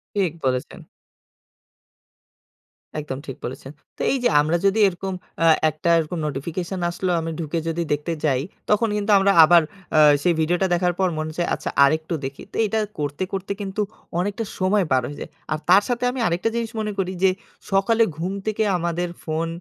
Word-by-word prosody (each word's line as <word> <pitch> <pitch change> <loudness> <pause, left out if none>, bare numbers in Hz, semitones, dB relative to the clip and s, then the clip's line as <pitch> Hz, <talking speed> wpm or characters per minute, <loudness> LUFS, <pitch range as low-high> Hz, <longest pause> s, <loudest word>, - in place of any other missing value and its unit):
ঠিক 190 -6 +1
বলেছেন। 130 -1 -2 2.2
একদম 145 -3 -5
ঠিক 135 - -6
বলেছেন। 130 +2 -7 0.3
তো - - -7
এই 275 - +1
যে - - +4
আমরা 155 +3 +1
যদি 200 +3 +3
এরকম 190 +1 -4 0.3
অ্যা 165 0 +5 0.2
একটা 155 +2 -3
এরকম 160 +2 -3
নোটিফিকেশন 170 +6 -4
আসলো, 180 +1 -2
আমি 165 0 -3
ঢুকে 165 0 -2
যদি 165 +1 -1
দেখতে 150 +3 -2
যাই। 135 -4 +2 0.3
তখন 215 +2 +3
কিন্তু 210 +1 0
আমরা 195 0 +4
আবার 170 +1 +7 0.4
আ - - +7 0.2
সেই 175 - +3
ভিডিওটা 175 +4 +1
দেখার 175 0 +1
পর 190 - +3
মনে 155 0 -2
হচ্ছে 175 +2 -2
আচ্ছা - - -3 0.2
আরেকটু 160 +4 0
দেখি। 135 +1 -7
তো - - -13
এটা 220 +2 0 0.2
করতে, 145 +4 -2
করতে 195 0 -3
কিন্তু 195 +1 -3 0.4
অনেকটা 205 +5 -2 0.2
সময় 190 +1 +2
পার 130 -1 +4
হয়ে 145 - -8
যায়। - - -6 0.2
আর 155 - 0
তার 190 +3 +7
সাথে 245 0 -1
আমি 260 - -5
আরেকটা 175 +6 0
জিনিস 230 -1 -2
মনে 215 -1 -2
করি 185 -1 0
যে 190 - +6 0.4
সকালে 205 +4 +3
ঘুম 180 +4 -2
থেকে 215 0 0
আমাদের 175 +1 -2
ফোন 160 +1 -2
175 Hz, 180 wpm, -22 LUFS, 155-195 Hz, 2.2 s, আবার